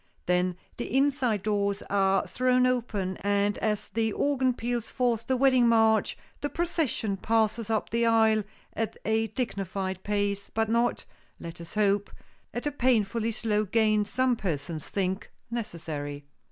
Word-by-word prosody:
Then 180 0 +1 0.2
the 240 - -4
inside 265 -7 +2
doors 200 -1 0
are 195 -1 +2
thrown 255 0 +2
open 225 -7 -1
and 205 +1 +1
as 210 -2 -1
the 225 -1 0
organ 260 0 +1
peals 240 -1 -3
forth 235 -3 0
the 260 - +2
wedding 255 -2 +5
march, 225 -1 +3 0.2
the 290 - -2
procession 310 - -1
passes 220 +2 +1
up 220 -1 -1
the 230 +1 +2
aisle 220 -1 +4 0.3
at 225 -1 -3
a 220 +1 +1
dignified 195 -6 -3
pace, 200 -1 -1
but 220 0 0
not, 235 +1 +1 0.3
let 170 0 -8
us 170 - -11
hope, 205 -1 +2 0.4
at 240 - -4
the 295 - -1
painfully 230 -4 +1
slow 215 -1 0
gait 215 0 +2
some 255 +1 +1
persons 160 -6 -4
think 190 0 -2 0.2
necessary. 155 -10 -5
220 Hz, 145 wpm, -28 LUFS, 200-240 Hz, 0.4 s, wedding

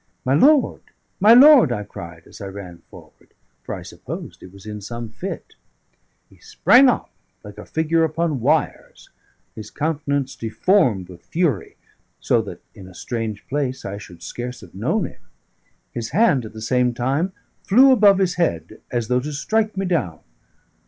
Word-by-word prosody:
"My 130 - +2
lord, 280 - +4 0.4
my 215 +4 +7
lord!" 270 - +8
I 105 -3 -2
cried 85 -4 -10
as - - -14
I 100 - -5
ran 95 -3 -9
forward, - - -18 0.3
for - - -6
I - - -9
supposed - - -9
he - - -12
was 95 +2 -16
in 105 -1 -7
some 115 +2 -7
fit. 185 - -7 0.7
He - - -23
sprang 260 +1 +5
up - - -2 0.3
like - - -11
a - - -11
figure 160 +1 +1
upon 160 -2 -1
wires, 150 +6 -1 0.4
his 110 - -9
countenance 145 -3 -2
deformed 115 - +1
with 90 -1 -15
fury, 155 - -1 0.4
so - - +2
that - - -10
in 95 - -12
a 95 - -15
strange 110 0 -5
place 135 -2 -3
I 100 +1 -5
should 85 -4 -13
scarce 125 +1 -6
have 95 -5 -15
known - - -1
him. - - -11 0.7
His 115 -2 -5
hand 160 - +2
at 110 - -10
the 110 - -9
same 125 +1 +1
time 140 +10 -1 0.3
flew 260 +7 +5
above 205 -6 +5
his 185 -3 0
head, 85 - -2
as 120 -3 -2
though 125 +1 +2
to 145 +4 -5
strike 215 +8 -1
me 195 - -1
down. 130 - -2
130 Hz, 170 wpm, -21 LUFS, 105-175 Hz, 0.7 s, lord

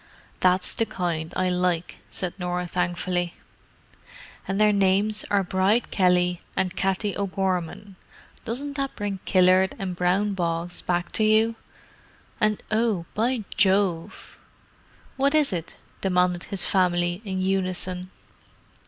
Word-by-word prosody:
"That's 185 0 +2
the 225 - 0
kind 165 -3 -3
I 185 0 +1
like," 180 -1 0
said 180 -2 -3
Norah 180 0 -2
thankfully. 175 0 -1 1.1
"And 195 +1 -1
their 210 0 +5
names 200 +2 +2
are 200 -1 +2
Bride 190 +5 +1
Kelly 180 -2 +2 0.2
and 185 0 0
Katty 195 +1 0
O'Gorman; 190 0 -2 0.5
doesn't 275 +4 -4
that 275 -1 -2
bring 205 -2 -3
Killard 185 0 +4
and 185 -2 -4
brown 185 +4 +1
bogs 170 -1 -2
back 175 0 -1
to 220 - +1
you? 220 +1 +4 0.9
And—oh, 215 -2 0
by 235 +1 0
Jove!" 190 -2 +1 0.8
"What 280 +2 +2
is 295 -8 +3
it?" 170 -2 -4 0.3
demanded 180 -2 +1
his 195 -3 -1
family, 175 -1 +1
in 190 -3 -3
unison. 185 -1 -1
185 Hz, 120 wpm, -25 LUFS, 180-205 Hz, 1.1 s, their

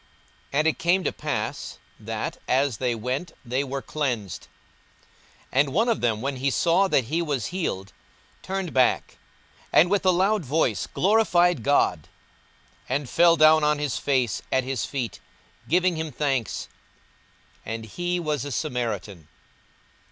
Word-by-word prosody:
And 150 +2 +1
it 160 - +1
came 180 +3 +2
to - - 0
pass, - - -4 0.2
that, - - -4
as 135 -2 +1
they 125 -1 0
went, 130 +9 -3
they 130 +3 0
were 135 0 -4
cleansed. 120 - -3 1.1
42:017:015 130 - +2
And 140 -1 +2
one 225 +7 +2
of 230 - 0
them, 110 -3 0
when 135 0 -2
he 135 +2 0
saw 170 +7 +3
that 135 - +2
he 155 +9 -1
was 145 -8 -2
healed, 95 - -3 0.5
turned 190 -3 -4
back, 130 -1 +2 0.5
and 175 +3 +5
with 205 - +2
a 190 - +4
loud 190 +2 +2
voice 130 - 0
glorified 180 - +3
God, 110 - +2 0.8
42:017:016 130 - +1
And 140 -3 -2
fell 170 -1 +5
down 155 0 +6
on 150 0 +3
his 145 -2 -2
face 130 -5 0
at 130 - +2
his 130 -2 -2
feet, 125 -8 -4 0.5
giving 180 0 +2
him 160 -1 -3
thanks: 135 -4 -2 1.0
and 115 0 -5
he 175 - -2
was 150 -5 -2
a 145 - -5
Samaritan. 105 - -3
145 Hz, 150 wpm, -25 LUFS, 125-170 Hz, 1.1 s, down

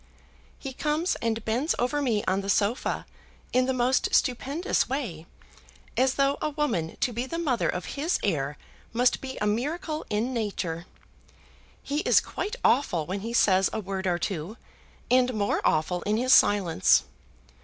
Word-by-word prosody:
"He 270 -2 -7
comes 305 +6 0
and 230 -1 -2
bends 245 +8 0
over 255 +4 0
me 230 -7 +1
on 190 +1 +1
the 195 - -6
sofa 205 +4 0 0.5
in 255 0 +3
the - - +2
most 255 0 +1
stupendous 275 - +1
way, 205 - -4 0.7
as 260 0 +2
though 275 0 +2
a - - 0
woman 285 - -2
to 245 - +1
be 240 +3 -3
the 335 - -4
mother 280 -9 0
of 180 - -3
his 310 +5 0
heir 150 -6 -1 0.4
must 245 +2 +2
be 260 -1 -6
a - - -1
miracle 305 - -2
in 220 +5 -1
nature. 185 -7 -3 1.0
He 285 +1 -2
is - - +4
quite 420 +5 -4
awful 175 - +2
when 190 +4 -3
he 225 +4 -5
says 195 -5 +4
a - - -3
word 190 -2 -4
or 175 -1 +1
two, 185 +3 -4 0.5
and 250 -1 +3
more 205 -1 0
awful 165 +3 +1
in 210 +4 0
his 255 +2 +3
silence. 190 - +4
235 Hz, 165 wpm, -27 LUFS, 195-265 Hz, 1.0 s, is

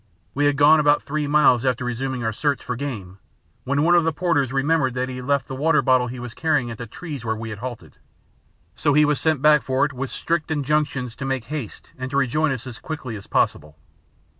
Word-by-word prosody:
We 145 +1 +1
had 145 -1 +1
gone 150 +2 +6
about 145 0 +3
three 150 0 -2
miles 145 -5 +4
after 130 -2 0
resuming 125 +1 -3
our 115 0 -1
search 145 +4 -1
for 125 - -3
game, 105 -9 -6 0.5
when 140 +3 +1
one 170 +2 +4
of 175 -1 +5
the 165 - +1
porters 155 -6 0
remembered 135 -1 +1
that 125 0 -1
he 130 - -6
had 125 0 -7
left 140 -2 +1
the - - -6
water 155 +5 +2
bottle 130 -2 +3
he 125 +1 -7
was 120 -1 -7
carrying 150 -7 0
at 115 - -8
the 115 - -6
trees 145 +1 -7
where 110 -1 -1
we 115 +1 -6
had 105 - -7
halted, 120 -1 -8 0.8
so 145 -2 +1
he 150 0 +6
was 150 -1 0
sent 155 -4 +1
back 150 -1 +6
for 130 +1 +1
it 145 - -4
with 130 +1 -4
strict 165 -2 -2
injunctions 145 -5 -1
to 140 - -5
make 135 -3 -2
haste 140 -5 -7
and 130 0 -4
to 140 - -2
rejoin 140 +3 +1
us 130 -3 -4
as 120 -3 -8
quickly 135 -8 -6
as 100 - -10
possible. 75 +1 0
135 Hz, 235 wpm, -22 LUFS, 125-150 Hz, 0.8 s, gone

